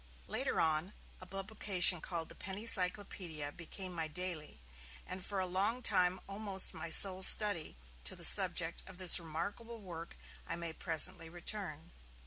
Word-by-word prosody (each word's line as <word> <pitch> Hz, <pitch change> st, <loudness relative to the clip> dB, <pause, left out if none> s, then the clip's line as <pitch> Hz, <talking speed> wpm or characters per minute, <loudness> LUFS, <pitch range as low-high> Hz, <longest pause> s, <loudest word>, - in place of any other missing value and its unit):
Later -, -, -2 dB
on, 160 Hz, +4 st, 0 dB, 0.3 s
a 185 Hz, -, -11 dB
publication 195 Hz, -3 st, 0 dB
called 170 Hz, -3 st, -2 dB
The -, -, -8 dB
Penny 195 Hz, +3 st, -7 dB
Cyclopaedia 180 Hz, -7 st, -1 dB
became 180 Hz, +3 st, -7 dB
my 165 Hz, -2 st, -4 dB
daily, 170 Hz, -, -5 dB, 0.5 s
and 185 Hz, 0 st, -8 dB
for 200 Hz, 0 st, -4 dB
a 185 Hz, -, -1 dB
long 200 Hz, +7 st, -2 dB
time 180 Hz, -3 st, +1 dB
almost 195 Hz, -1 st, 0 dB
my -, -, -7 dB
sole 190 Hz, +3 st, +3 dB
study; 190 Hz, -, +6 dB, 0.3 s
to -, -, +2 dB
the -, -, +3 dB
subject -, -, +6 dB
of 190 Hz, -1 st, -12 dB
this 185 Hz, -1 st, +1 dB
remarkable 200 Hz, +8 st, -7 dB
work 170 Hz, -4 st, -10 dB, 0.3 s
I -, -, -4 dB
may 170 Hz, -1 st, -6 dB
presently 165 Hz, +1 st, +2 dB
return. 175 Hz, -2 st, -6 dB
180 Hz, 150 wpm, -34 LUFS, 165-195 Hz, 0.5 s, study